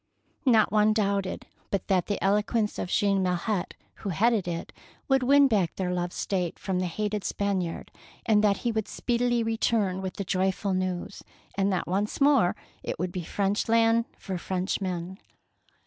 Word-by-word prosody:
Not 220 Hz, -4 st, +5 dB
one 215 Hz, 0 st, +4 dB
doubted 200 Hz, -3 st, -1 dB, 0.2 s
but 195 Hz, -2 st, -1 dB
that 185 Hz, -2 st, +2 dB
the 205 Hz, -, -1 dB
elo 200 Hz, +2 st, +4 dB
quence 215 Hz, -1 st, -1 dB
of -, -, -3 dB
Jean 200 Hz, 0 st, +2 dB
Milhet, 185 Hz, +2 st, -1 dB, 0.2 s
who 200 Hz, -, -5 dB
headed 210 Hz, +2 st, +2 dB
it, 170 Hz, -1 st, -4 dB, 0.3 s
would 270 Hz, -1 st, +3 dB
win 280 Hz, +2 st, +6 dB
back 200 Hz, -9 st, +1 dB
their 180 Hz, -1 st, -2 dB
loved 175 Hz, 0 st, -2 dB
State 180 Hz, -4 st, -2 dB
from 190 Hz, -2 st, -2 dB
the 185 Hz, -, 0 dB
hated 210 Hz, +3 st, -2 dB
Spaniard, 190 Hz, -4 st, -2 dB, 0.3 s
and 215 Hz, -2 st, +4 dB
that 200 Hz, -2 st, +3 dB
he 235 Hz, -, +2 dB
would 220 Hz, -2 st, -2 dB
speedily 240 Hz, -1 st, 0 dB
return 220 Hz, -4 st, 0 dB
with 190 Hz, -1 st, -4 dB
the 200 Hz, -, -3 dB
joyful 190 Hz, +1 st, 0 dB
news, 185 Hz, 0 st, -3 dB, 0.3 s
and 195 Hz, 0 st, +1 dB
that 185 Hz, -, -1 dB
once 200 Hz, +4 st, -1 dB
more 275 Hz, -10 st, +4 dB, 0.3 s
it -, -, -4 dB
would 180 Hz, 0 st, -2 dB
be 180 Hz, -, -4 dB
French 200 Hz, +5 st, -1 dB
land 230 Hz, 0 st, +4 dB
for 190 Hz, -3 st, -5 dB
French 185 Hz, +3 st, -2 dB
men. 185 Hz, 0 st, -4 dB
200 Hz, 175 wpm, -27 LUFS, 185-220 Hz, 0.3 s, win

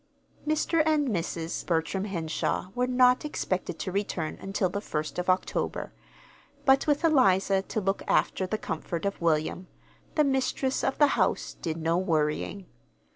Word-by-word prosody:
Mr. 310 Hz, +1 st, +2 dB
and 305 Hz, -3 st, +2 dB
Mrs. 170 Hz, -4 st, -3 dB
Bertram 170 Hz, +3 st, -1 dB
Henshaw 170 Hz, -1 st, -2 dB
were 250 Hz, 0 st, 0 dB
not 250 Hz, 0 st, +4 dB
expected 185 Hz, -, -2 dB
to 185 Hz, -, -4 dB
return 180 Hz, -5 st, -2 dB
until 195 Hz, 0 st, 0 dB
the 200 Hz, +3 st, -4 dB
first 155 Hz, -4 st, -3 dB
of 180 Hz, -, -2 dB
October; 185 Hz, 0 st, -1 dB, 0.7 s
but 270 Hz, +2 st, +4 dB
with 295 Hz, +2 st, +2 dB
Eliza 195 Hz, -, +4 dB
to 205 Hz, -, -3 dB
look 195 Hz, 0 st, -1 dB
after 190 Hz, -, +1 dB
the 215 Hz, -, -1 dB
comfort 165 Hz, -1 st, -4 dB
of 200 Hz, -2 st, -2 dB
William, 165 Hz, +2 st, 0 dB, 0.5 s
the 305 Hz, -, +4 dB
mistress 265 Hz, -1 st, 0 dB
of 270 Hz, -, 0 dB
the 290 Hz, -1 st, +5 dB
house -, -, 0 dB
did 160 Hz, -2 st, -2 dB
no 165 Hz, +1 st, +1 dB
worrying. 165 Hz, +2 st, -1 dB
195 Hz, 150 wpm, -28 LUFS, 170-255 Hz, 0.7 s, the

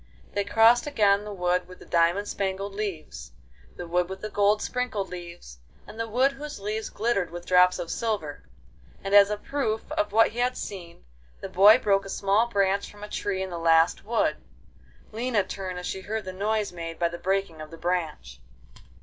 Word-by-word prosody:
They 200 Hz, -, 0 dB
crossed 225 Hz, +5 st, +4 dB
again 205 Hz, -7 st, +2 dB
the 210 Hz, -, -6 dB
wood 180 Hz, -2 st, 0 dB
with 185 Hz, 0 st, -12 dB
the -, -, -14 dB
diamond 175 Hz, +4 st, +2 dB
spangled 195 Hz, 0 st, -3 dB
leaves, 175 Hz, -, -6 dB, 0.4 s
the -, -, -7 dB
wood 175 Hz, +1 st, 0 dB
with 190 Hz, +2 st, -7 dB
gold 205 Hz, +1 st, +3 dB
sprinkled 245 Hz, -6 st, -2 dB
leaves, 170 Hz, -, -10 dB, 0.3 s
and 220 Hz, -, -12 dB
the 230 Hz, -, -2 dB
wood 255 Hz, +5 st, +3 dB
whose 295 Hz, -2 st, -8 dB
leaves 215 Hz, +2 st, -3 dB
glittered 210 Hz, -5 st, -1 dB
with 175 Hz, +1 st, -8 dB
drops 180 Hz, 0 st, +5 dB
of 165 Hz, -, -5 dB
silver, 195 Hz, -, -3 dB, 0.5 s
and 195 Hz, +1 st, -3 dB
as 200 Hz, 0 st, +8 dB
a 210 Hz, -, -2 dB
proof 225 Hz, -2 st, -3 dB
of 205 Hz, -, -1 dB
what 225 Hz, +2 st, +5 dB
he 235 Hz, -, -7 dB
had 250 Hz, +1 st, 0 dB
seen, 175 Hz, -, -8 dB, 0.3 s
the -, -, -7 dB
boy 205 Hz, +5 st, +7 dB
broke 195 Hz, -5 st, +1 dB
a -, -, -8 dB
small 200 Hz, +4 st, +1 dB
branch 200 Hz, -3 st, 0 dB
from 210 Hz, 0 st, -13 dB
a 210 Hz, -, -7 dB
tree 190 Hz, -2 st, -2 dB
in 190 Hz, -, -6 dB
the 170 Hz, -, -4 dB
last 165 Hz, 0 st, +3 dB
wood. 230 Hz, +2 st, 0 dB, 0.7 s
Lina 225 Hz, -1 st, 0 dB
turned 185 Hz, -1 st, -6 dB
as 180 Hz, -, -6 dB
she 190 Hz, -, -4 dB
heard 215 Hz, +1 st, -4 dB
the 185 Hz, -, -6 dB
noise 210 Hz, +2 st, -1 dB
made 165 Hz, -1 st, -6 dB
by 170 Hz, -, +1 dB
the 170 Hz, +1 st, -7 dB
breaking 190 Hz, -4 st, -1 dB
of 155 Hz, -, -8 dB
the 165 Hz, -, -11 dB
branch. 160 Hz, -, -3 dB
195 Hz, 195 wpm, -26 LUFS, 175-215 Hz, 0.7 s, as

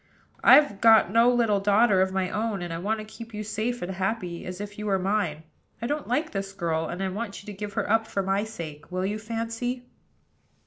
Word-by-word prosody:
I've 270 Hz, -7 st, +6 dB
got 220 Hz, -5 st, +6 dB
no 230 Hz, +3 st, +5 dB
little 230 Hz, -4 st, +2 dB
daughter 205 Hz, 0 st, +4 dB
of 190 Hz, 0 st, +2 dB
my 190 Hz, -1 st, -1 dB
own, 210 Hz, -3 st, -2 dB
and 175 Hz, -1 st, -4 dB
I 165 Hz, -, -4 dB
want 210 Hz, +5 st, -1 dB
to 215 Hz, -, -7 dB
keep 230 Hz, +1 st, -10 dB
you 210 Hz, -, -3 dB
as 215 Hz, -, -6 dB
safe 230 Hz, +1 st, -2 dB
and 180 Hz, -, -3 dB
happy 190 Hz, -2 st, -3 dB
as 180 Hz, 0 st, -6 dB
if 205 Hz, 0 st, -7 dB
you 210 Hz, -, -4 dB
were 195 Hz, -1 st, +2 dB
mine. 185 Hz, -5 st, -1 dB, 0.4 s
I 235 Hz, -, -4 dB
don't 295 Hz, +4 st, -2 dB
like 295 Hz, +7 st, 0 dB
this 195 Hz, 0 st, -4 dB
girl, 165 Hz, -3 st, -1 dB
and 180 Hz, +3 st, -4 dB
I 190 Hz, -, 0 dB
want 205 Hz, +1 st, -5 dB
you -, -, -19 dB
to 210 Hz, -, -7 dB
give 205 Hz, +1 st, -6 dB
her -, -, -1 dB
up 225 Hz, +1 st, +2 dB
for 195 Hz, -, -1 dB
my 195 Hz, +2 st, +1 dB
sake. 165 Hz, -9 st, -8 dB
Will 185 Hz, +1 st, -1 dB
you, 210 Hz, +2 st, -2 dB
Fancy?" 230 Hz, +3 st, -3 dB
205 Hz, 235 wpm, -26 LUFS, 190-225 Hz, 0.4 s, I've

